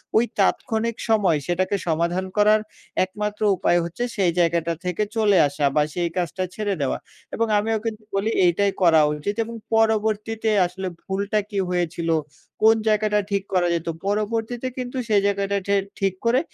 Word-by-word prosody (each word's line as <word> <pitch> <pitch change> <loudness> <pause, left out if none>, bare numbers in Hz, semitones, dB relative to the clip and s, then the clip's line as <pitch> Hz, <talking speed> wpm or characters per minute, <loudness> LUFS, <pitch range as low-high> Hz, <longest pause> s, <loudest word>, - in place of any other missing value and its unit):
ঐ - - +7 0.2
তাৎক্ষণিক 230 -1 +1
সময় 200 -8 +3
সেটাকে 185 +3 0
সমাধান 170 +3 0
করার 210 +1 +5 0.4
একমাত্র 210 +3 -4 0.2
উপায় 175 - +2
হচ্ছে 170 +8 -4
সেই 185 -4 +3
জায়গাটা 170 -1 +2
থেকে 180 +3 0
চলে 210 -3 +3
আসা 145 0 -2
বা 150 - +4
সেই 175 -1 -1
কাজটা 180 +1 -1
ছেড়ে 210 -2 -1
দেওয়া" 135 - 0 0.4
এবং 230 - +1
আমিও 220 +1 0
কিন্তু 220 -1 -4
বলি, 200 +3 +1 0.2
"এইটাই 195 +3 +2
করা 165 -3 +6 0.2
উচিত" 205 +8 -3
এবং 230 +1 -8 0.2
পরবর্তীতে 220 0 +1 0.2
আসলে 185 +2 -5 0.2
ভুলটা 200 +2 -1
কী 205 -3 -2
হয়েছিল? 170 -2 -1 0.5
কোন 220 +1 +6
জায়গাটা 210 -1 +2
ঠিক 200 -1 0
করা 180 -1 +3
যেত? 165 0 -4 0.2
পরবর্তীতে 225 +4 -1
কিন্তু 250 0 -4
সেই 205 -2 +4
জায়গাটা 200 0 0
ঠে 200 - +3 0.2
ঠিক 195 -2 +1
করে 235 +3 +4
200 Hz, 160 wpm, -23 LUFS, 175-220 Hz, 0.5 s, ঐ